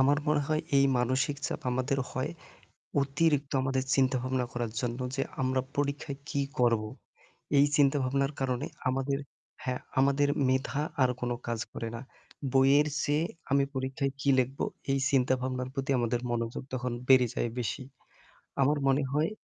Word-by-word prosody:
আমার 145 +2 +4
মনে 150 -1 +3
হয় 155 0 +2 0.2
এই 135 - +6
মানসিক 130 +3 +1
চাপ - - -4
আমাদের 130 +2 0
হয় 130 +5 -2 0.7
অতিরিক্ত 140 0 +1
আমাদের 130 0 0
চিন্তাভাবনা 130 -1 +1
করার 120 -2 -2
জন্য 120 -1 -2 0.2
যে 135 - 0 0.2
আমরা 130 0 +2 0.2
পরীক্ষায় 140 0 -2
কী 140 - 0 0.2
করব। 115 -3 +3 0.8
এই 140 - +7
চিন্তাভাবনার 140 -1 +2
কারণে 130 +2 -1 0.2
আমাদের 135 +1 0 0.5
হ্যাঁ, 125 -1 -2 0.2
আমাদের 140 +1 +3 0.2
মেধা 130 +1 0 0.2
আর 125 - +4
কোন 125 - -1 0.2
কাজ 115 -2 -2
করে 115 - -4
না। 115 - -5 0.5
বইয়ের 135 +2 +5
চেয়ে 150 +3 +1 0.3
আমি 140 0 +4
পরীক্ষায় 130 +1 -1
কী 140 - +2
লিখব, 130 +2 0 0.3
এই 135 - +3
চিন্তাভাবনার 130 -1 +1
প্রতি 135 0 -2
আমাদের 120 0 0
মনোযোগ 115 -1 -2
তখন 125 -1 -2 0.2
বেড়ে 130 -2 +7
যায় - - 0
বেশি। 125 +3 -2 0.8
আমার 145 +3 +3
মনে 135 +1 +3
হয় 150 +3 +2
135 Hz, 150 wpm, -29 LUFS, 125-140 Hz, 0.8 s, এই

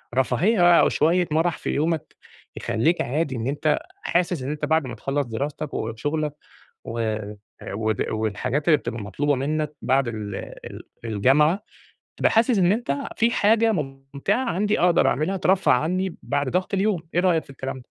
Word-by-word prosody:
رفاهية 175 - +4
أو - - +4
شوية 175 +3 +2
مَرَح 160 +2 +1
في - - -5
يومك 160 +1 -1 0.4
يخلّيك 160 +10 +1
عادي 140 +2 -1
إن 115 0 -3
أنت 150 +2 +1 0.2
حاسس 175 -4 0
إن 135 - -3
أنت 150 0 -3
بعد 160 -2 +1
ما 120 - -6
تخلَّص 135 +5 -2
دراستك 140 +5 -4
وشُغلك 145 +7 -2 0.5
و 115 +1 -3 0.7
ود 110 0 -1
والحاجات 110 +7 -2
اللي 155 -3 +6
بتبقى 115 -5 -5
مطلوبة 140 +9 0
منّك 150 +3 -2
بعد 135 0 +2
ال 105 -3 -4 0.3
ال - - -9 0.2
الجامعة، 140 - +3 0.5
تبقى - - +2
حاسس 225 0 +3
إن 180 0 +4
أنت 210 -10 -1 0.2
في 230 +1 +3
حاجة 225 +1 +3
مُمتِعة 140 - -2
عندي 210 +4 0
أقدر 175 -1 +4
أعملها 155 +7 0
ترفَّه 190 0 +3
عنّي 180 +7 0
بعد 140 -1 -1
ضَغْط 185 +5 -1
اليوم، 195 -2 +1
إيه 175 - +4
رأيك 175 -3 +2
في - - -16
الكلام 135 -1 -5
ده؟ 125 - -15
150 Hz, 165 wpm, -24 LUFS, 130-180 Hz, 0.7 s, اللي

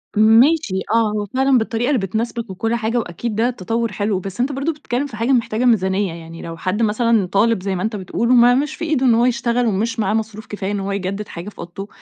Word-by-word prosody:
ماشي، 225 - +4
آه، 225 -2 +3
هو 210 -1 -2
فعلًا 265 +5 +2
بالطريقة 230 +1 -1
اللي 270 -5 +2
بتناسبَك 225 +3 -3
وكل 225 +5 -1
حاجة 230 +1 -1
وأكيد 220 +1 -3
ده 230 +3 +2
تطوُّر 230 0 -2
حلو. 205 -1 -1
بس 195 +3 -8
أنتَ 255 +4 +1
برضو 275 +4 -1
بتتكلَّم 285 -2 -3
في 255 - -10
حاجة 235 +4 0
محتاجة 235 -1 +1
ميزانية. 195 -5 +2
يعني، 165 0 -10
لو 165 0 -7
حد 190 +6 -2
مثلًا 225 -1 +2
طالب، 200 +1 +2
زي 195 -1 -1
ما 180 - -3
أنتَ 220 0 -2
بتقول، 205 +4 -2
وما 245 0 +6
مش 295 +3 -1
في 330 - -4
إيده 300 -5 +1
إن 240 - +5
هو 235 +1 +3
يشتغَل، 240 0 +1
ومش 225 +2 -1
معاه 210 -1 +1
مصروف 220 -1 -3
كفاية 205 -1 -4
إن 205 - -2
هو 195 +1 -3
يجدّد 200 +1 -3
حاجة 175 +4 -7
في - - -19
أوضته، 175 +4 -7
220 Hz, 235 wpm, -19 LUFS, 195-240 Hz, -, وما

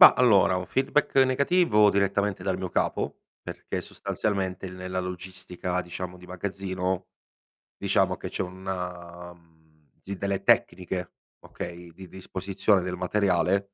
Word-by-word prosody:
Ma, - - +12
allora 100 -7 +5
un 90 0 -3
feedback 135 +3 +1
negativo 130 - +5
direttamente 100 -1 +1
dal 95 -1 -1
mio 95 - -3
capo, - - -1 0.2
perché - - -5
sostanzialmente 95 -2 -2
nella 90 0 -4
logistica, 90 0 -4
diciamo, 90 +1 -6
di 90 0 -14
magazzino, 95 0 -3 0.7
diciamo, - - +2
che - - -6
c'è - - -3
una 90 -2 -5 0.7
delle 100 0 -2
tecniche, 90 0 +2 0.3
okay, 85 0 -8
di 95 +2 -11
disposizione 95 +2 0
del 90 0 -3
materiale 95 0 +2
95 Hz, 120 wpm, -27 LUFS, 90-100 Hz, 0.7 s, Ma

